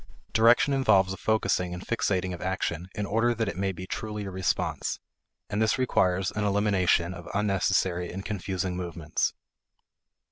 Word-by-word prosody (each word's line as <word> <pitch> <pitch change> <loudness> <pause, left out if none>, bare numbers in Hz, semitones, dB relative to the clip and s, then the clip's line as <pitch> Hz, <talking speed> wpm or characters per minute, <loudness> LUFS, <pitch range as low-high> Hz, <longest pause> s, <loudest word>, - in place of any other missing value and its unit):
Direction 120 +5 +5
involves 100 -8 +3
a - - -4
focusing 90 -5 0
and 90 - -8
fixating 95 -5 0
of 85 - -7
action 90 -1 -2
in 105 - -2
order 115 +4 +1
that 115 -1 -1
it 100 - -3
may 95 +1 0
be 90 0 -7
truly 105 +1 -4
a 95 - -5
response, 95 0 -1 0.5
and 105 - -1
this 110 +3 +2
requires 95 -7 +1
an 105 - -2
elimination 100 -4 +2
of 90 -2 -9
unnecessary 95 -3 +1
and 95 +2 -6
confusing 95 -2 -2
movements. 85 -3 -2
95 Hz, 155 wpm, -27 LUFS, 90-105 Hz, 0.5 s, Direction